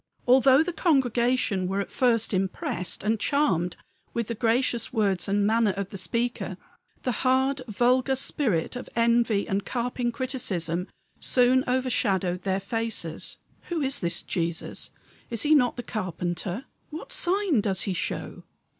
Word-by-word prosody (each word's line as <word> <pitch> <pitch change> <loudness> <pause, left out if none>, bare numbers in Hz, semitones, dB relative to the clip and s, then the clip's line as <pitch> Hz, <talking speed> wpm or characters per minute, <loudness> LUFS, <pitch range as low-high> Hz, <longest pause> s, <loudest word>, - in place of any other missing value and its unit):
Although 265 +3 +6
the 355 - -3
congregation 245 - +2
were 195 +2 -1
at 200 - -3
first 230 -4 +2
impressed 185 -1 -2
and 220 +1 +1
charmed 185 - +1 0.4
with 235 -1 -1
the - - 0
gracious 235 +1 +1
words 205 -6 +1
and 200 +1 +2
manner 220 -1 +3
of 200 -1 -3
the - - -9
speaker, 230 +7 -2 0.5
the 250 - +1
hard, 265 +1 +2
vulgar 250 +5 +2
spirit 250 - -1
of 250 - -6
envy 235 -3 +2
and 195 +1 -1
carping 245 +1 -2
criticism 195 - -2 0.3
soon 255 +1 +3
overshadowed 205 -8 +1
their 190 0 0
faces. 220 -5 -3 0.3
"Who 340 -3 -1
is 270 -1 0
this 170 -1 -1
Jesus 170 -2 -2 0.4
is 230 -2 -2
he 300 - +4
not 250 -5 +4
the 245 - -4
carpenter? 180 - -3 0.2
What 315 - -8
sign 365 - +2
does 195 -3 0
he 195 - -1
show? 175 - -3
230 Hz, 145 wpm, -26 LUFS, 195-255 Hz, 0.5 s, Although